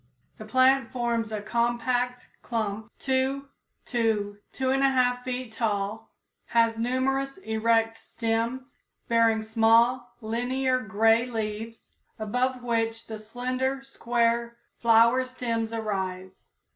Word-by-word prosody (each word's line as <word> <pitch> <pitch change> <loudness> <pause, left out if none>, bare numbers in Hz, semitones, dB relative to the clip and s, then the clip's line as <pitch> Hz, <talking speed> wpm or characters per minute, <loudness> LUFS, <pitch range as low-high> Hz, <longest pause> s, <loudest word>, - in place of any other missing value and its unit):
The 215 - -8
plant 255 +2 +3
forms 235 -3 -1
a 210 -1 -4
compact 240 +2 0
clump 220 -1 -3
2 265 +1 0 0.4
to 215 -4 0
2 265 - -4
1/2 260 -2 +2
feet 255 -2 -4
tall, 215 -1 -2 0.4
has 230 -1 +2
numerous 260 +3 -1
erect 225 -5 +1
stems, 230 +4 -3 0.3
bearing 230 -1 +3
small, 230 +2 +3
linear 255 +3 0
gray 225 +2 +3
leaves, 225 -1 -5 0.3
above 250 +4 -1
which 225 -1 -1
the 220 -1 -7
slender, 255 +4 -2
square, 235 -2 0 0.2
flower 235 +2 +5
stems 230 -3 -3
arise. 190 -4 -4
235 Hz, 105 wpm, -27 LUFS, 225-255 Hz, 0.4 s, flower